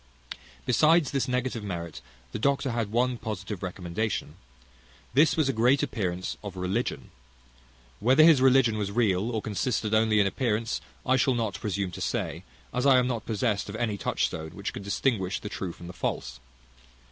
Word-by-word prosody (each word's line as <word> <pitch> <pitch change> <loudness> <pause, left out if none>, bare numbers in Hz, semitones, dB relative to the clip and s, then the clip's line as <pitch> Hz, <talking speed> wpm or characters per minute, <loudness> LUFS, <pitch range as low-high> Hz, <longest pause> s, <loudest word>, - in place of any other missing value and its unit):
Besides 155 +4 +4
this 135 -2 0
negative 125 -3 -1
merit, 85 -5 -5 0.3
the - - -4
doctor 140 +2 +1
had 115 -3 -2
one 125 +1 +1
positive 105 -2 -5
recommendation; 90 +3 -3 0.8
this 150 +6 +4
was 155 -4 +3
a 135 - +1
great 125 +5 +3
appearance 90 -4 -2
of 100 -2 -6
religion. 95 +7 -2 0.9
Whether 130 +7 +5
his 155 -5 +7
religion 130 -4 +4
was 100 -1 -1
real, 105 -2 +1
or 110 -3 -2
consisted 110 0 -1
only 110 -1 +4
in 100 - +4
appearance, 115 +2 -1 0.2
I 130 0 +3
shall 130 0 +2
not 110 -4 -1
presume 100 -3 -2
to - - -8
say, - - -2 0.3
as 125 +3 +1
I 135 -2 +7
am 125 - +3
not 120 -3 -3
possessed 105 -2 -1
of 100 - -6
any 110 -2 -1
touchstone 80 -5 -2
which 100 - -4
can - - -6
distinguish 100 -1 0
the 105 - -6
true 95 -3 -4
from 85 - -12
the 90 - -8
false. 65 -7 -3
110 Hz, 170 wpm, -27 LUFS, 100-125 Hz, 0.9 s, his